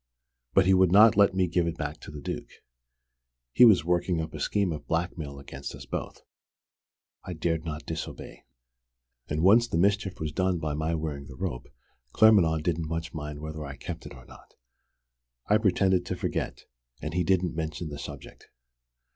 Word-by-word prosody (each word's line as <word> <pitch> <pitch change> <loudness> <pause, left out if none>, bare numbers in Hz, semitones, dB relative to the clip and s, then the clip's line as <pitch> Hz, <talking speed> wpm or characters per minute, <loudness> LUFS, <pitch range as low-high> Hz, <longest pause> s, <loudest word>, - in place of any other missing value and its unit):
But 95 - +5
he 95 - +5
would 95 -2 +4
not 105 +3 +7
let 100 -2 +4
me 95 -1 +3
give 85 0 +1
it 85 0 -3
back 75 0 -4
to - - -11
the 75 -1 -8
Duke. - - -5 1.0
He 125 - +8
was 100 -9 +6
working 90 0 +1
up 80 -1 -4
a - - -6
scheme 100 -4 0
of 75 - -6
blackmail 80 -4 -3
against 70 0 -8
us - - -10
both. - - -6 1.0
I 90 - -6
dared 80 0 -2
not 75 -1 -5
disobey 80 - -7 0.8
and 75 +2 -1
once 115 +6 +6
the 85 - -2
mischief 100 +1 +1
was 80 -1 -3
done 95 +2 0
by 80 -2 -3
my 80 +2 -1
wearing 75 -3 -4
the 65 - -11
rope 60 -1 -4 0.5
Claremanagh 90 -8 +5
didn't 85 -1 -1
much 80 0 -4
mind 75 -1 -6
whether 80 0 -6
I 70 -1 -7
kept - - -7
it - - -11
or 60 -1 -14
not. - - -17 0.9
I 105 +1 +3
pretended 95 -3 +2
to - - -2
forget, - - -3 0.3
and 75 - -5
he 90 0 +1
didn't 90 0 +1
mention 80 +1 -4
the 70 -1 -7
subject. - - -10
80 Hz, 180 wpm, -27 LUFS, 75-95 Hz, 1.0 s, He